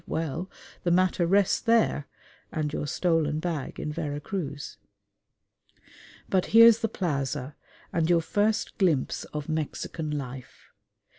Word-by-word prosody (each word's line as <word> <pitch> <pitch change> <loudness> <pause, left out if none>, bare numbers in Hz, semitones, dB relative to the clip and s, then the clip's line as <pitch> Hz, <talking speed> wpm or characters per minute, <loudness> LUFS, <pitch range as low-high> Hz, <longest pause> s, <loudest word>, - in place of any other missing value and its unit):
well, 165 +3 -3 0.3
the 175 - 0
matter 180 0 +2
rests 195 +1 +3
there 225 - +2 0.4
and 150 -2 -2
your 150 - -2
stolen 155 -2 +1
bag 160 -5 -4
in 150 - -3
Vera 145 -3 -3
Cruz. 150 -4 -5 1.5
But 185 -2 +1
here's 230 +1 +8
the 225 - -1
plaza, 140 -6 -2 0.4
and 165 -2 +1
your 170 -1 +4
first 210 +7 0
glimpse 165 -9 +1
of 150 -1 -6
Mexican 155 0 -3
life. 135 -3 -7
160 Hz, 125 wpm, -27 LUFS, 150-185 Hz, 1.5 s, here's